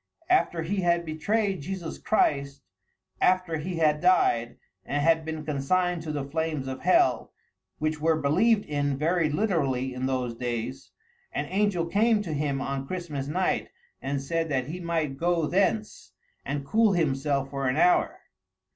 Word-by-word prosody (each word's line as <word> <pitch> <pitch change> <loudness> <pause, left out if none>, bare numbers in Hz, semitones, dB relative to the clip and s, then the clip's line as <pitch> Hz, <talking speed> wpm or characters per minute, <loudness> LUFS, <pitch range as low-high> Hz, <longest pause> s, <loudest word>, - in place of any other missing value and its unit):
After 175 - +2
he 195 +5 -2
had 170 -2 +1
betrayed 195 +4 -1
Jesus 175 +1 -5
Christ, 140 -8 0 0.6
after 180 -3 +2
he 175 +4 -4
had 150 -2 +2
died, 120 -10 +2 0.3
and 145 - -2
had 160 +2 +3
been 160 -1 -5
consigned 170 +5 0
to 160 -1 -5
the 145 -2 -3
flames 155 -2 -2
of 130 0 -5
hell, 130 -9 +3 0.5
which 155 0 -2
were 160 0 +2
believed 200 +10 +3
in 145 -2 -1
very 165 +2 +1
literally 145 - 0
in 130 +1 -2
those 130 -3 -1
days, 120 +2 -4 0.4
an - - -2
angel 195 -3 +1
came 210 +4 +2
to 165 -5 -4
him 140 -2 -1
on 135 0 -3
Christmas 155 -6 -4
night 180 +5 0 0.3
and 140 +1 -2
said 165 +3 -1
that 130 -3 0
he 175 +3 -5
might 165 -5 -2
go 170 0 +1
thence 150 - -1 0.3
and 140 0 -3
cool 215 +6 +3
himself 140 -4 0
for 135 -1 -2
an 130 +3 0
hour. 180 +2 +3
155 Hz, 155 wpm, -27 LUFS, 140-180 Hz, 0.6 s, had